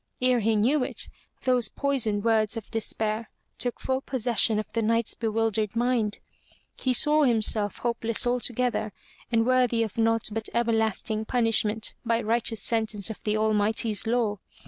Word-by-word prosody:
Ere 250 -1 +3
he 225 0 +1
knew 250 +7 +2
it, - - -3 0.3
those 250 -2 +2
poisoned 235 -8 0
words 220 -1 +2
of 225 - -8
despair 220 0 -2 0.3
took 245 -1 -1
full 260 0 -2
possession 240 -4 +1
of 215 - -2
the 230 - 0
Knight's 230 +1 +2
bewildered 220 -1 -1
mind. 235 -3 0 0.6
He 260 - -1
saw 300 +5 +3
himself 220 -5 +2
hopeless 230 -1 0
altogether 245 -3 0 0.4
and 225 -1 +2
worthy 250 -2 +2
of 220 0 -5
naught 225 -1 +2
but 220 +1 -3
ever 235 0 +1
lasting 220 0 -1
punishment 225 -2 +1
by 230 -1 +1
righteous 225 -1 0
sentence 220 -2 0
of 220 - -10
the 210 0 -1
Almighty's 215 0 0
law. 225 -4 0
225 Hz, 150 wpm, -26 LUFS, 215-240 Hz, 0.6 s, Ere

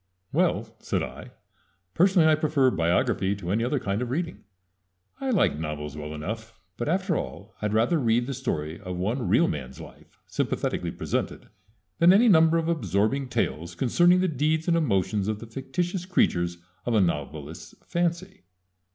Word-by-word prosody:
"Well," - - +1
said - - -1
I, - - -8 0.6
"personally 180 -2 +4
I 155 - +6
prefer 150 -4 +2
biography 90 +3 +1
to 90 -3 -5
any 110 +3 +1
other 130 +4 0
kind 100 0 -2
of 125 - -2
reading. 165 +1 -3 0.7
I 270 - -2
like 195 - +2
novels 75 -1 -5
well 75 0 -6
enough; 110 +7 -6 0.2
but 120 +7 -3
after 185 0 +1
all 105 -5 -5
I'd 105 0 -1
rather 120 +10 +3
read 120 -1 +2
the 135 - -4
story 80 - -3
of 90 -3 -6
one 110 +7 -1
real - - +4
man's 65 0 -5
life, - - -14
sympathetically - - -2
presented, - - -3 0.5
than 170 +2 +7
any 230 +4 +6
number 165 -2 +5
of 165 -1 -1
absorbing 125 - 0
tales 85 -5 -2
concerning 175 - +4
the 185 - +2
deeds 155 +1 0
and 170 - +3
emotions 105 - +1
of 110 -1 -1
the 115 - -9
fictitious 170 - -3
creatures 85 - +1 0.3
of 120 - 0
a - - +5
novelist's 75 -3 -3
fancy. 175 - -2
120 Hz, 165 wpm, -26 LUFS, -, 0.7 s, than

